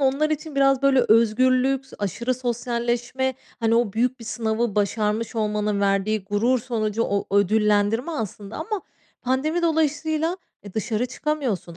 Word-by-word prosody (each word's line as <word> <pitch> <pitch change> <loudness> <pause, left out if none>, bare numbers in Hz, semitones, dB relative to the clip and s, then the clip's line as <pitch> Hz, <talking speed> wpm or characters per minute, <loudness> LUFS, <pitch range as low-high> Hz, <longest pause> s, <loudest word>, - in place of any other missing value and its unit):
onlar 280 +3 +2
için 310 -1 -3
biraz 275 -1 +3
böyle 275 -1 +5
özgürlük, 255 +4 +3
aşırı 230 +6 -1
sosyalleşme, 240 +1 -2 0.3
hani 225 0 +2
o 230 -4 +2
büyük 245 +2 0
bir 230 - -9
sınavı 225 -1 -1
başarmış 210 +2 0
olmanın 210 -1 0
verdiği 200 +1 +1
gurur 220 +6 +1
sonucu 225 -3 -1
o 200 -3 -1
ödüllendirme 210 - +2
aslında 210 - -5
ama 405 +5 -3 0.4
pandemi 300 +7 0
dolayısıyla, 315 +1 +1 0.3
eee, 200 - -11
dışarı 220 +2 -1
çıkamıyorsun, 250 - -3
235 Hz, 135 wpm, -23 LUFS, 210-270 Hz, 0.4 s, böyle